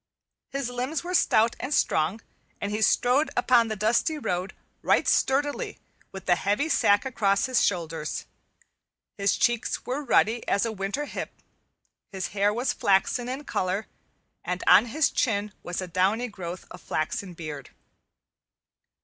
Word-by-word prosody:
His 275 -2 -3
limbs 255 +6 -3
were 360 +1 -4
stout 230 -9 +3
and 260 - -5
strong, 180 - +1 0.4
and 200 - -3
he 210 +1 -2
strode 250 +7 +3
along 245 -1 +4
the 215 - -3
dusty 230 - +1
road 185 -8 -3 0.3
right - - +2
sturdily 290 - +1 0.3
with 190 -2 -9
the 175 - +4
heavy 205 - 0
sack 205 -6 +3
across 200 -6 +1
his 255 -2 +2
shoulders. 165 -4 -2 0.9
His 200 -1 +2
cheeks 240 -1 0
were 270 +4 -3
ruddy 230 -2 +2
as 200 +3 +2
a 230 - -2
winter 205 +8 -3
hip, - - -5 0.8
his 190 -2 -4
hair 205 0 +1
was 240 +5 -1
flaxen 200 +5 +1
in 265 +3 -4
color, 190 -3 -2 0.6
and 180 0 -3
on 195 +6 +7
his 295 +6 +1
chin 210 -4 0
was 175 +1 -4
a - - -6
downy 195 +8 +1
growth 180 -3 -7
of - - -10
flaxen 175 +4 -3
beard. 150 -5 -7
215 Hz, 150 wpm, -26 LUFS, 190-255 Hz, 0.9 s, on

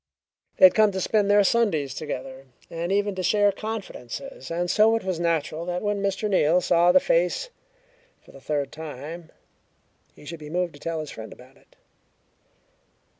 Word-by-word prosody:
They - - +8
had 185 - +7
come 215 -2 +4
to 190 - -2
spend 205 +2 +1
their 205 0 +5
Sundays 185 - +1
together, 135 -2 -6 0.3
and 170 +2 -3
even 205 0 +1
to 185 - -4
share 205 +3 +3
confidences, 220 - -7
and 175 +1 -2
so 220 +1 +4
it 225 - -2
was 185 -3 -2
natural 165 -1 -1
that 180 +2 -3
when 205 -1 -1
Mr. 200 +2 -1
Neal 180 -4 +3
saw 175 0 +3
the 185 - +6
face 180 - 0 0.7
for - - -19
the 135 - -15
third 145 -2 -2
time 160 +2 -8 0.9
he - - -16
should 165 +2 -7
be 150 -1 -9
moved 175 +1 -2
to 145 - -14
tell 165 +1 -3
his 155 - -8
friend 110 0 -9
about 130 +2 -15
it. - - -27
175 Hz, 175 wpm, -25 LUFS, 155-200 Hz, 0.9 s, They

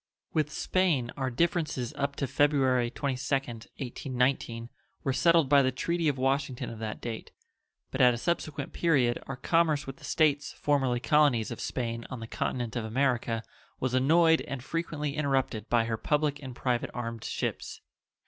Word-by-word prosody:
With 155 -1 +1
Spain 155 -10 +1
our 130 -2 -1
differences 150 -3 0
up 140 0 -2
to 140 - -1
February 130 -3 +2
22d, 130 -3 -2
1819 125 -2 -1 0.3
were 135 -4 0
settled 165 +1 +4
by 140 0 +6
the 130 -1 +2
treaty 170 +5 -1
of 145 -2 +1
Washington 135 0 -1
of 115 - -8
that 110 -1 -4
date, 115 -2 -6 0.6
but - - -1
at 125 -1 +7
a 120 - -2
subsequent 150 -1 -2
period 135 -8 +2
our 135 - -4
commerce 155 +1 +2
with 135 0 -7
the - - -18
States 145 -3 +1
formerly 135 -4 +1
colonies 130 -2 +3
of - - -6
Spain 115 -2 -3
on 130 - -6
the 115 - -6
continent 120 +1 -3
of 120 - -1
America 120 -1 0 0.4
was 130 -1 -1
annoyed 160 +5 +5
and 130 -2 -5
frequently 150 -2 -3
interrupted 135 -7 0
by 120 -1 +3
her 115 -1 -2
public 150 +2 0
and 130 -3 -7
private 125 -1 -1
armed 115 -2 -4
ships. - - -4
135 Hz, 165 wpm, -29 LUFS, 120-150 Hz, 0.6 s, at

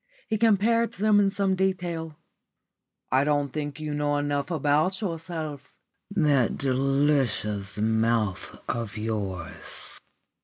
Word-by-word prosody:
He 220 -2 0
compared 230 +1 +3
them 210 -1 +3
in 200 -1 +4
some 195 -1 +1
detail. 175 -4 -2 0.9
"I 130 +2 +4
don't 145 -2 +1
think 145 -1 -4
you 155 -1 -3
know 145 0 +1
enough 145 +1 -1
about 155 +4 +2
yourself," 165 -6 -5 0.3
he 200 - -10
said. 170 -7 +3
"That 140 -6 +3
delicious 130 -7 +1
mouth 110 -2 0
of 115 -3 -3
yours!" 105 -6 -4
145 Hz, 120 wpm, -26 LUFS, 120-185 Hz, 0.9 s, in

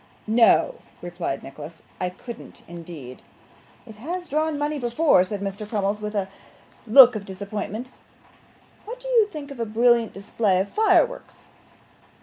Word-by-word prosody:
'No,' 235 - +3 0.2
replied 175 -5 -4
Nicholas, 150 +4 -11 0.2
'I 180 - -1
couldn't 230 +6 -11
indeed.' 165 -7 -10 0.6
'It 220 -3 -13
has 350 +9 -5
drawn 310 0 -1
money 295 0 -2
before 245 - +3
now,' - - +5
said 200 +1 -5
Mr. 200 +1 -5
Crummles, 205 -1 -1
with 210 0 -5
a 195 -2 -1 0.6
look 250 +1 +8
of 210 - -4
disappointment. 205 +5 -6 0.9
'What 480 +3 -8
do - - -9
you 470 -4 +4
think 300 -7 -9
of 275 - -10
a 230 - -1
brilliant 235 +1 +3
display 200 -1 0
of 195 +2 -1
fireworks? 465 +3 +1
220 Hz, 145 wpm, -24 LUFS, 195-285 Hz, 0.9 s, look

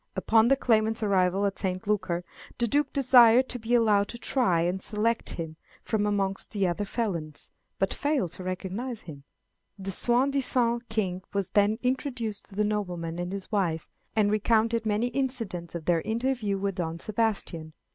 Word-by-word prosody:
Upon 225 0 +4
the 275 - +5
claimant's 220 -4 +1
arrival 195 -1 +2
at 200 - -1
St. 185 -1 -2
Lucar, 185 -4 0 0.3
the 235 - +1
Duke 285 +4 +1
desired 250 -2 +6
to 245 - -3
be 235 +2 +1
allowed 210 -4 +3
to 235 - -7
try 235 -9 +2
and 180 +3 -1
select 225 +3 0
him 160 -2 -6 0.3
from 210 -2 0
amongst 195 -1 -1
the 200 -2 +1
other 185 +3 -1
felons, 175 -10 -4 0.3
but 195 - 0
failed 285 - 0
to 185 - -9
recognize 195 +6 -4
him. 145 -4 -11 0.5
The 195 0 -4
soi 245 +7 +2
disant 240 -3 0
King 190 -5 -1
was 200 -2 -1
then 205 +1 +3
introduced 250 -5 -2
to 200 - -15
the 210 - +2
nobleman 180 -5 -2
and 175 +1 -3
his 195 +1 -6
wife, 175 -7 -1 0.2
and 210 -2 +3
recounted 225 +1 +2
many 215 +3 +1
incidents 230 -11 -3
of 165 -2 -5
their 170 -2 +2
interview 230 -2 -1
with 195 0 -1
Don 165 -3 -3
Sebastian. 195 -6 -2
210 Hz, 170 wpm, -27 LUFS, 185-235 Hz, 0.5 s, desired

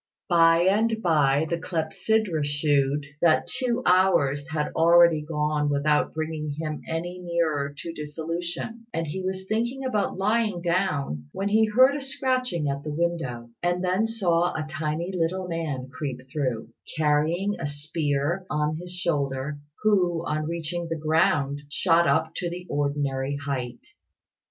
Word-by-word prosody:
By 165 -1 +5
and 220 +4 +2
by, 150 -3 +3
the 170 +1 -1
clepsydra 170 +2 0
shewed 145 -1 +1 0.2
that 170 -2 +4
two 250 -1 -1
hours 165 -6 +3
had 155 -2 -1
already 170 -1 +6
gone 150 -1 0
without 150 +1 +2
bringing 155 -2 -3
him 155 -2 -3
any 175 +3 -3
nearer 165 -5 0
to 165 - -6
dissolution; 170 +9 -5
and 165 0 -1
he 160 +5 -4
was 190 0 -3
thinking 235 +6 -1
about 215 -8 0
lying 210 -2 +1
down, 145 - -1
when 200 +1 -1
he 220 +2 +4
heard 255 +6 +5
a 290 - -3
scratching 255 - -1
at 140 0 -2
the 155 - -5
window, 145 -8 -2
and 175 +1 0
then 185 +5 +2
saw 175 -6 +1
a 155 -1 -2
tiny 155 +4 -3
little 180 +2 -1
man 155 -7 -3
creep 130 -1 -5
through, 130 -8 -2 0.3
carrying 160 +6 +1
a - - -2
spear 145 +3 -2
on 150 +1 0
his 175 +1 -8
shoulder, 145 -5 -2 0.2
who, 180 -6 +2
on 155 0 -1
reaching 170 +1 -3
the 165 - -1
ground, 145 -2 +1
shot 170 +2 +3
up 160 0 +2
to 175 - -2
the 180 +1 -7
ordinary 140 -1 -1
height. 135 -4 -4
165 Hz, 145 wpm, -26 LUFS, 145-180 Hz, 0.3 s, already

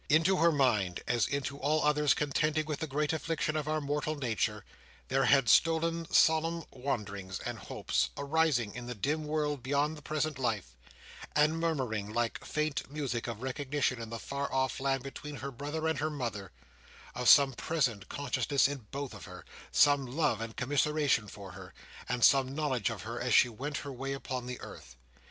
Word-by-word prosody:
Into 165 +5 +4
her 170 0 +5
mind, 110 - +1
as 120 - +2
into 140 0 -3
all 150 +3 +1
others 150 -1 +3
contending 155 +2 0
with 150 -2 -3
the 160 - -3
great 150 +2 0
affliction 160 -1 -1
of 150 -1 -2
our 155 0 +1
mortal 150 +1 -2
nature, 120 -8 -1 0.4
there 135 +1 +2
had 135 -3 +4
stolen 165 +3 +3
solemn 165 +1 +3
wonderings 100 -8 -4
and - - -5
hopes, - - -1
arising 140 -6 +1
in 120 -1 -7
the 125 - -5
dim 150 +9 -1
world 150 -2 -1
beyond 145 +4 0
the 150 - -11
present 155 -1 -2
life, 105 - -2 0.6
and 150 +2 +3
murmuring, 125 -11 -1
like 120 0 -1
faint 155 -2 -2
music, 135 -6 -3
of 115 0 -5
recognition 130 -1 -1
in 115 - -6
the 115 - -4
far 140 +4 -4
off 130 -2 0
land 135 -1 0
between 145 +2 -7
her 140 0 -5
brother 145 +5 -3
and 160 -3 0
her 155 +2 0
mother: 115 -10 -4 0.6
of 125 0 +2
some 140 -2 +7
present 125 -8 -1
consciousness 140 -1 +1
in 135 -6 -6
both 140 -1 -5
of - - -10
her: - - -11 0.3
some 145 -2 +4
love 135 -4 0
and 115 -1 -6
commiseration 145 -3 +1
for 100 -1 -10
her: 95 -1 -11 0.3
and 125 -1 -1
some 135 -1 +5
knowledge 135 -9 0
of - - -6
her 115 +2 -5
as 125 -2 +2
she 125 - +6
went 140 +6 -4
her 140 - -5
way 135 +2 -4
upon 130 -2 -4
the 125 0 -5
earth. 60 0 -11
140 Hz, 185 wpm, -31 LUFS, 120-150 Hz, 0.6 s, some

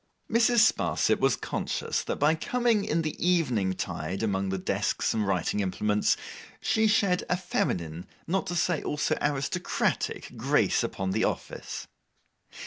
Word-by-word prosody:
Mrs. 230 +1 +4
Sparsit - - +1
was - - +3
conscious - - -2
that - - -1
by 150 +2 +3
coming 230 +5 +1
in 165 +2 0
the 155 - -3
evening 125 - +2
tide 90 +2 -4
among 95 -2 0
the 95 - -1
desks 90 - 0
and 110 -2 0
writing 95 +1 0
implements, 105 +2 +1 0.4
she 220 0 +2
shed 200 -4 +2
a 180 - +2
feminine, 85 - -2 0.2
not 190 +3 -1
to 175 - -2
say 175 -2 +1
also 150 - 0
aristocratic, 145 +5 -1
grace - - +2
upon 95 -1 -2
the - - +1
office. - - -3
145 Hz, 140 wpm, -28 LUFS, -, 0.4 s, Mrs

